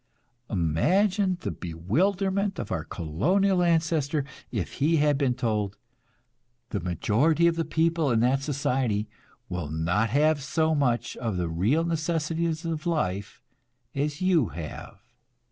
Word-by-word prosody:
Imagine 185 Hz, -, +2 dB
the -, -, -3 dB
bewilderment 190 Hz, -, 0 dB
of -, -, -5 dB
our 85 Hz, -4 st, -1 dB
colonial 180 Hz, -, +1 dB
ancestor 160 Hz, -4 st, +1 dB, 0.3 s
if 105 Hz, -8 st, -3 dB
he 160 Hz, +4 st, +4 dB
had 150 Hz, -1 st, +3 dB
been 135 Hz, -3 st, +1 dB
told: 105 Hz, -5 st, -1 dB, 0.9 s
"The 105 Hz, -, -1 dB
majority 120 Hz, -, +2 dB
of 170 Hz, -1 st, +3 dB
the 165 Hz, -1 st, -1 dB
people 165 Hz, -2 st, +1 dB
in 115 Hz, -2 st, +2 dB
that 130 Hz, +3 st, +2 dB
society 130 Hz, -6 st, 0 dB, 0.4 s
will 85 Hz, -4 st, -4 dB
not 85 Hz, +8 st, 0 dB
have 150 Hz, +4 st, +3 dB
so 160 Hz, +4 st, +1 dB
much 130 Hz, -5 st, 0 dB
of 110 Hz, -6 st, -2 dB
the 85 Hz, -2 st, -1 dB
real 105 Hz, -, +1 dB
necessities 165 Hz, 0 st, -1 dB
of 165 Hz, -1 st, -3 dB
life 100 Hz, -, -2 dB, 0.5 s
as 145 Hz, +2 st, -2 dB
you 175 Hz, -, +3 dB
have. 80 Hz, -3 st, -8 dB
145 Hz, 130 wpm, -27 LUFS, 105-165 Hz, 0.9 s, he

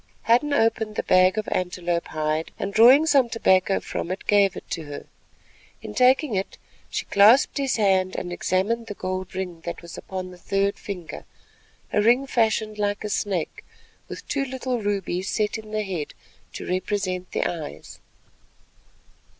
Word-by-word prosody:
Hadden 245 Hz, +6 st, +3 dB
opened 225 Hz, -4 st, +1 dB
the -, -, -1 dB
bag 185 Hz, +2 st, +4 dB
of 215 Hz, -, -2 dB
antelope 175 Hz, -1 st, -1 dB
hide 155 Hz, +1 st, -2 dB
and 200 Hz, -, -4 dB
drawing 250 Hz, +8 st, +7 dB
some 275 Hz, -6 st, +4 dB
tobacco 195 Hz, -4 st, +2 dB
from -, -, -5 dB
it, 185 Hz, -, -5 dB
gave 200 Hz, -2 st, +3 dB
it -, -, -10 dB
to 160 Hz, -, -4 dB
her. 145 Hz, -1 st, -8 dB, 0.8 s
In -, -, -7 dB
taking 255 Hz, +1 st, +3 dB
it 195 Hz, 0 st, -3 dB, 0.3 s
she -, -, -3 dB
clasped 220 Hz, +9 st, +5 dB
his 275 Hz, -2 st, 0 dB
hand 190 Hz, -3 st, +2 dB
and 175 Hz, -1 st, -4 dB
examined 215 Hz, +7 st, -1 dB
the 205 Hz, -, -6 dB
gold 185 Hz, 0 st, -4 dB
ring 180 Hz, -3 st, -5 dB
that 170 Hz, 0 st, -6 dB
was 170 Hz, -, -9 dB
upon 185 Hz, -1 st, -6 dB
the 180 Hz, -, -14 dB
third 195 Hz, +2 st, 0 dB
finger, 180 Hz, -5 st, -7 dB, 0.7 s
a 210 Hz, -, +3 dB
ring 240 Hz, +5 st, +4 dB
fashioned 220 Hz, -4 st, 0 dB
like 205 Hz, 0 st, -1 dB
a 210 Hz, -, -3 dB
snake 190 Hz, -5 st, -2 dB, 0.4 s
with -, -, -9 dB
two 280 Hz, -1 st, -1 dB
little 255 Hz, -2 st, -3 dB
rubies 195 Hz, -2 st, -2 dB
set 215 Hz, 0 st, -1 dB
in 215 Hz, -1 st, -12 dB
the 215 Hz, 0 st, -2 dB
head 180 Hz, -7 st, -5 dB, 0.4 s
to -, -, -7 dB
represent 185 Hz, -1 st, -2 dB
the -, -, -1 dB
eyes. 160 Hz, -4 st, -6 dB
200 Hz, 165 wpm, -24 LUFS, 185-225 Hz, 0.8 s, drawing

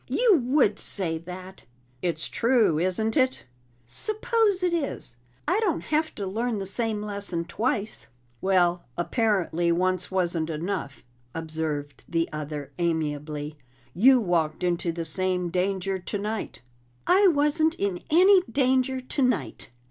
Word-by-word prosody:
"You 455 Hz, -7 st, +4 dB
would 250 Hz, -6 st, +3 dB
say 165 Hz, -5 st, +1 dB
that!" 185 Hz, +2 st, -10 dB, 0.4 s
"It's 165 Hz, -3 st, -1 dB
true, 230 Hz, -10 st, +2 dB
isn't 185 Hz, +6 st, 0 dB
it?" 260 Hz, -1 st, +1 dB, 0.4 s
"Suppose 430 Hz, -, +1 dB
it 355 Hz, -1 st, +2 dB
is! 280 Hz, -, -3 dB, 0.3 s
I 365 Hz, +6 st, +2 dB
don't 395 Hz, -8 st, 0 dB
have 310 Hz, +1 st, -1 dB
to 200 Hz, -, -4 dB
learn 225 Hz, +4 st, -2 dB
the 195 Hz, -, -4 dB
same 210 Hz, +2 st, -1 dB
lesson 200 Hz, -5 st, -3 dB
twice." 215 Hz, -1 st, -2 dB, 0.3 s
"Well, 180 Hz, -2 st, +2 dB
apparently 175 Hz, -2 st, +1 dB
once 185 Hz, +1 st, 0 dB
wasn't 175 Hz, -4 st, -1 dB
enough," 165 Hz, -2 st, -4 dB, 0.3 s
observed 155 Hz, -3 st, -4 dB
the 165 Hz, -1 st, +1 dB
other 150 Hz, -2 st, -5 dB
amiably. 150 Hz, -2 st, -2 dB, 0.3 s
"You 255 Hz, +8 st, +6 dB
walked 170 Hz, -6 st, 0 dB
into 175 Hz, -1 st, 0 dB
the 165 Hz, 0 st, -4 dB
same 180 Hz, +1 st, -1 dB
danger 190 Hz, +1 st, -1 dB
tonight." 210 Hz, +4 st, -4 dB, 0.4 s
"I 390 Hz, +2 st, +5 dB
wasn't 315 Hz, 0 st, +2 dB
in 195 Hz, -3 st, -2 dB
any 370 Hz, +4 st, +6 dB
danger 260 Hz, 0 st, +1 dB
tonight!" 250 Hz, -, -1 dB
190 Hz, 125 wpm, -26 LUFS, 170-255 Hz, 0.4 s, You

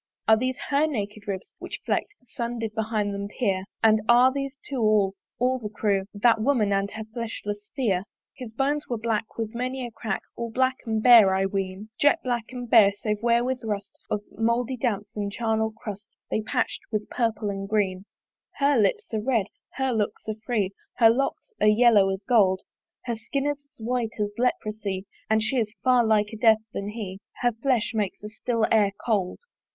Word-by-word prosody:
Are 220 Hz, -, +7 dB
these 255 Hz, +3 st, -1 dB
her 290 Hz, +2 st, +3 dB
naked 210 Hz, -6 st, -4 dB
ribs, 195 Hz, -1 st, -5 dB
which -, -, -6 dB
fleck'd 415 Hz, -, -1 dB
The 250 Hz, -, -31 dB
sun 235 Hz, -1 st, -4 dB
that -, -, -6 dB
did 220 Hz, -1 st, -3 dB
behind 215 Hz, -2 st, -1 dB
them 200 Hz, 0 st, -4 dB
peer? 195 Hz, -4 st, -1 dB, 0.2 s
And 220 Hz, -1 st, +5 dB
are 245 Hz, +2 st, +7 dB
these 275 Hz, 0 st, -4 dB
two 275 Hz, -, -4 dB
all, 215 Hz, -3 st, +3 dB, 0.2 s
all 255 Hz, +1 st, +1 dB
the 215 Hz, -3 st, -5 dB
crew, 200 Hz, -2 st, 0 dB
That 225 Hz, +1 st, +4 dB
woman 220 Hz, -5 st, +2 dB
and 195 Hz, 0 st, +1 dB
her 220 Hz, +1 st, -6 dB
fleshless 210 Hz, -3 st, -5 dB
Pheere? 205 Hz, -9 st, +1 dB, 0.3 s
His 250 Hz, -5 st, -8 dB
bones 280 Hz, +5 st, -1 dB
were 240 Hz, -, -2 dB
black 220 Hz, -1 st, -2 dB
with 225 Hz, -1 st, -3 dB
many 255 Hz, +2 st, -3 dB
a 240 Hz, -, -7 dB
crack, 220 Hz, -2 st, -3 dB
All 235 Hz, 0 st, -4 dB
black 260 Hz, +2 st, +1 dB
and 220 Hz, -1 st, 0 dB
bare, 225 Hz, -6 st, +8 dB
I 190 Hz, 0 st, +2 dB
ween; 195 Hz, +1 st, -3 dB
Jet 290 Hz, -, +5 dB
black 240 Hz, -3 st, -1 dB
and 250 Hz, -1 st, -6 dB
bare, 225 Hz, -4 st, +7 dB
save 210 Hz, +1 st, -3 dB
where 235 Hz, 0 st, +3 dB
with 255 Hz, 0 st, -2 dB
rust 205 Hz, -2 st, -3 dB, 0.2 s
Of 210 Hz, -, -1 dB
mouldy 235 Hz, +3 st, 0 dB
damps 210 Hz, -4 st, -2 dB
and 205 Hz, -1 st, -2 dB
charnel 220 Hz, 0 st, 0 dB
crust 210 Hz, -1 st, -8 dB, 0.2 s
They're 220 Hz, -, +1 dB
patch'd 215 Hz, -, -1 dB
with 215 Hz, -1 st, -2 dB
purple 225 Hz, -3 st, 0 dB
and 195 Hz, 0 st, -5 dB
green. 195 Hz, -3 st, 0 dB, 0.5 s
Her 280 Hz, -2 st, +3 dB
lips 205 Hz, +2 st, +1 dB
are 215 Hz, -, 0 dB
red, 230 Hz, -3 st, +1 dB, 0.3 s
her 265 Hz, 0 st, 0 dB
looks 215 Hz, -1 st, -2 dB
are 215 Hz, -, -1 dB
free, 210 Hz, -6 st, +1 dB, 0.2 s
Her 225 Hz, -2 st, +6 dB
locks 275 Hz, -, -2 dB
are -, -, +5 dB
yellow 210 Hz, -2 st, +6 dB
as 190 Hz, +1 st, -3 dB
gold: 195 Hz, -4 st, +3 dB, 0.4 s
Her 235 Hz, -2 st, -2 dB
skin 270 Hz, +5 st, -3 dB
is 290 Hz, -1 st, -3 dB
as -, -, -26 dB
white 235 Hz, 0 st, -2 dB
as 205 Hz, 0 st, -1 dB
leprosy, 215 Hz, -5 st, -1 dB, 0.2 s
And 220 Hz, 0 st, +3 dB
she 260 Hz, +4 st, 0 dB
is 220 Hz, -3 st, 0 dB
far 250 Hz, -2 st, +5 dB
liker 220 Hz, 0 st, +1 dB
Death 220 Hz, -1 st, +4 dB
than 200 Hz, +1 st, -3 dB
he; 205 Hz, -3 st, -6 dB, 0.2 s
Her 245 Hz, -1 st, +3 dB
flesh 235 Hz, 0 st, 0 dB
makes 210 Hz, -4 st, -1 dB
the 210 Hz, -, -7 dB
still 225 Hz, +1 st, 0 dB
air 205 Hz, -3 st, +4 dB
cold. 200 Hz, -6 st, 0 dB
220 Hz, 200 wpm, -26 LUFS, 205-245 Hz, 0.5 s, bare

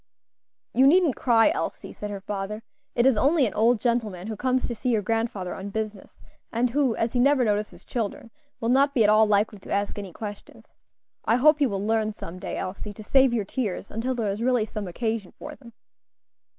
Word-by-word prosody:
"You 265 Hz, +2 st, +5 dB
needn't 330 Hz, -2 st, +4 dB
cry, 235 Hz, +3 st, +4 dB
Elsie," 370 Hz, -, -4 dB
said 210 Hz, -, -6 dB
her 200 Hz, -1 st, -6 dB
father; 205 Hz, +2 st, -5 dB, 0.3 s
"it 240 Hz, -, +3 dB
is 265 Hz, -2 st, +5 dB
only 280 Hz, +6 st, +3 dB
an 210 Hz, -, -2 dB
old 230 Hz, +2 st, +3 dB
gentleman 215 Hz, -6 st, -1 dB
who 220 Hz, 0 st, -4 dB
comes 255 Hz, +3 st, 0 dB
to 240 Hz, -, -3 dB
see 250 Hz, +2 st, -3 dB
your 220 Hz, -4 st, +1 dB
grandfather 225 Hz, -4 st, -2 dB
on 195 Hz, +1 st, -6 dB
business, 215 Hz, -1 st, -5 dB, 0.3 s
and 235 Hz, +1 st, 0 dB
who, 265 Hz, -3 st, +1 dB
as 225 Hz, 0 st, -1 dB
he 250 Hz, -, +1 dB
never 270 Hz, 0 st, +4 dB
notices 210 Hz, 0 st, -2 dB
children, 230 Hz, 0 st, -4 dB, 0.3 s
will 230 Hz, -, -1 dB
not 275 Hz, +3 st, +3 dB
be 235 Hz, -, +5 dB
at 210 Hz, -, +5 dB
all 215 Hz, 0 st, +5 dB
likely 210 Hz, 0 st, +1 dB
to -, -, -11 dB
ask 200 Hz, +1 st, -1 dB
any 195 Hz, -3 st, -7 dB
questions. 205 Hz, +2 st, -9 dB, 0.5 s
I 225 Hz, -, +3 dB
hope 300 Hz, +4 st, +4 dB
you 275 Hz, -, +4 dB
will 200 Hz, -1 st, -3 dB
learn 220 Hz, -1 st, +1 dB
some 185 Hz, -3 st, -8 dB
day, -, -, -5 dB
Elsie, 200 Hz, +2 st, -5 dB
to 215 Hz, -, -10 dB
save 265 Hz, +3 st, +4 dB
your 225 Hz, -4 st, -1 dB
tears 205 Hz, -4 st, -4 dB
until 245 Hz, +4 st, -2 dB
there 225 Hz, -4 st, -1 dB
is 205 Hz, +3 st, -5 dB
really 245 Hz, -2 st, +2 dB
some 210 Hz, -2 st, -6 dB
occasion 220 Hz, +1 st, -3 dB
for 300 Hz, -, -8 dB
them." 245 Hz, -5 st, -15 dB
225 Hz, 210 wpm, -25 LUFS, 205-250 Hz, 0.5 s, You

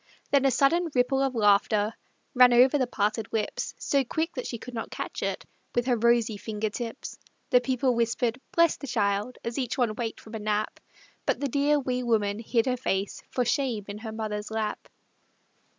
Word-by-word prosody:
Then 275 Hz, -1 st, +4 dB
a -, -, +6 dB
sudden 305 Hz, +7 st, +2 dB
ripple 260 Hz, +2 st, +2 dB
of 270 Hz, -2 st, 0 dB
laughter 210 Hz, 0 st, +3 dB, 0.4 s
Ran 250 Hz, -2 st, +7 dB
over 255 Hz, +4 st, +6 dB
the 255 Hz, -, +1 dB
parted 215 Hz, -1 st, -1 dB
lips 220 Hz, -2 st, -2 dB
So 275 Hz, -1 st, +1 dB
quick 320 Hz, +6 st, -2 dB
that 255 Hz, -, -4 dB
she 235 Hz, -, -4 dB
could 250 Hz, +3 st, -10 dB
not 225 Hz, -, -4 dB
catch -, -, -5 dB
it -, -, -2 dB, 0.3 s
With 240 Hz, -, +1 dB
her 250 Hz, -2 st, +2 dB
rosy 235 Hz, -1 st, +2 dB
finger 215 Hz, 0 st, -3 dB
tips. 230 Hz, +1 st, -6 dB, 0.3 s
The 250 Hz, -, +6 dB
people 255 Hz, 0 st, +1 dB
whispered 235 Hz, +1 st, 0 dB
"Bless 335 Hz, -1 st, +4 dB
the 280 Hz, -, -8 dB
child," 210 Hz, 0 st, 0 dB
As 235 Hz, +3 st, -3 dB
each 250 Hz, -3 st, -2 dB
one 240 Hz, -4 st, +1 dB
waked 230 Hz, -1 st, -4 dB
from 220 Hz, -, -13 dB
a 220 Hz, -, -4 dB
nap, 210 Hz, 0 st, -1 dB, 0.5 s
But -, -, +1 dB
the 285 Hz, -, 0 dB
dear, 285 Hz, +3 st, +2 dB
wee 255 Hz, -2 st, -1 dB
woman 215 Hz, -4 st, +1 dB
hid 230 Hz, 0 st, +1 dB
her 255 Hz, -1 st, 0 dB
face 195 Hz, -5 st, -2 dB
For 250 Hz, -, 0 dB
shame 240 Hz, -4 st, 0 dB
in 205 Hz, +1 st, -6 dB
her 220 Hz, 0 st, -6 dB
mother's 215 Hz, -1 st, -4 dB
lap. 220 Hz, -1 st, -3 dB
235 Hz, 195 wpm, -27 LUFS, 215-255 Hz, 0.5 s, Ran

